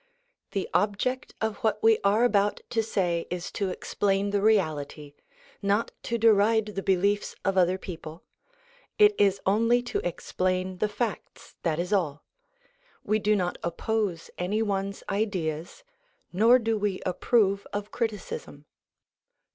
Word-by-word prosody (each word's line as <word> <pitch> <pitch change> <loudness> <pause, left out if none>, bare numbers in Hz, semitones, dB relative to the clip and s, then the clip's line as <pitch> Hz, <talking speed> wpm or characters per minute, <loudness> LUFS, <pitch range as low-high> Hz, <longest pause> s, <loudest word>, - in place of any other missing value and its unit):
The 195 -3 -1
object 215 +6 0
of 220 -2 -1
what 215 -1 -1
we 225 -1 +5
are 205 +4 +3
about 205 -4 +2
to 225 - +2
say 180 -6 -1
is 180 0 -4
to 200 -2 -2
explain 195 +2 -1
the 200 -1 +1
reality 155 -8 0 0.5
not 200 +2 +1
to 235 - -2
deride 220 0 +4
the 195 - -3
beliefs 200 +2 +1
of 195 -1 +1
other 185 0 +3
people; 165 -3 -9 0.7
it 420 -1 +6
is 195 -1 +3
only 230 +5 +3
to 245 - -2
explain 185 +1 -2
the 210 - +1
facts, 210 -1 -5
that 160 -3 0
is 180 +4 -2
all. 155 -7 0 0.8
We 215 +1 +1
do 210 0 +2
not 180 -3 -1
oppose 180 0 -2
any 205 +5 0
one's 200 -1 -2
ideas, 185 - -2 0.5
nor 225 +7 +6
do 225 -3 -1
we 200 -2 -1
approve 200 +2 +1
of 205 0 -4
criticism. 210 -10 -4
200 Hz, 140 wpm, -27 LUFS, 185-220 Hz, 0.8 s, it